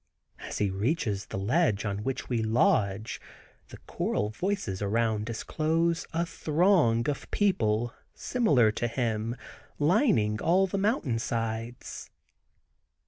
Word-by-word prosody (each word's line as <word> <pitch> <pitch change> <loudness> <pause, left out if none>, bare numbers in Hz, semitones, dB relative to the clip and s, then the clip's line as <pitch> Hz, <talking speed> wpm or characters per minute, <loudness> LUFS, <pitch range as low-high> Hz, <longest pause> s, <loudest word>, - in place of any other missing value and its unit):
As - - -6
he 100 -2 +1
reaches 105 - -1
the - - -5
ledge 110 - +1
on 100 -1 -2
which 135 +2 -3
we 120 -3 0
lodge 110 -2 +1 0.5
the - - -11
choral 105 0 -1
voices 125 - -2
around 110 +1 0
disclose 160 +8 0
a 170 +1 0
throng 155 - +2
of 145 - -3
people 120 - +1 0.2
similar 145 - +3
to 120 +2 -2
him 115 -1 -2 0.4
lining 135 - +2
all 185 +3 +4
the 195 +1 -2
mountain 195 - 0
sides. 115 +1 -4
115 Hz, 120 wpm, -28 LUFS, 110-165 Hz, 0.5 s, all